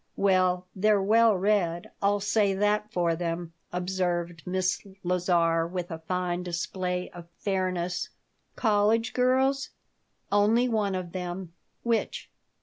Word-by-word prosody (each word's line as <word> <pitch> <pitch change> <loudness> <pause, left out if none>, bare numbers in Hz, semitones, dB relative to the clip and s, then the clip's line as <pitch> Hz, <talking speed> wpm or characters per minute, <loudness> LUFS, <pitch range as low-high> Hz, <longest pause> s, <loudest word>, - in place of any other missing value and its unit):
"Well, 185 -2 +2
they're 210 +1 +3
well 220 +1 +4
read. 180 -3 0
I'll 200 0 +2
say 205 -1 +2
that 210 +1 +1
for 170 -2 +1
them," 165 0 -3 0.2
observed 175 -2 -2
Miss 185 +1 0 0.2
Lazar, 170 -2 +2
with 180 0 -5
a 165 - -5
fine 180 +1 -2
display 180 +1 -3
of 175 -1 -11
fairness 185 -3 -1 0.5
"College 220 +1 +2
girls?" 265 +2 +2 0.6
"Only 215 +5 +4
one 210 -5 0
of 180 -2 -4
them." 180 -1 -5 0.3
"Which?" 235 -2 -1
185 Hz, 120 wpm, -27 LUFS, 175-210 Hz, 0.6 s, well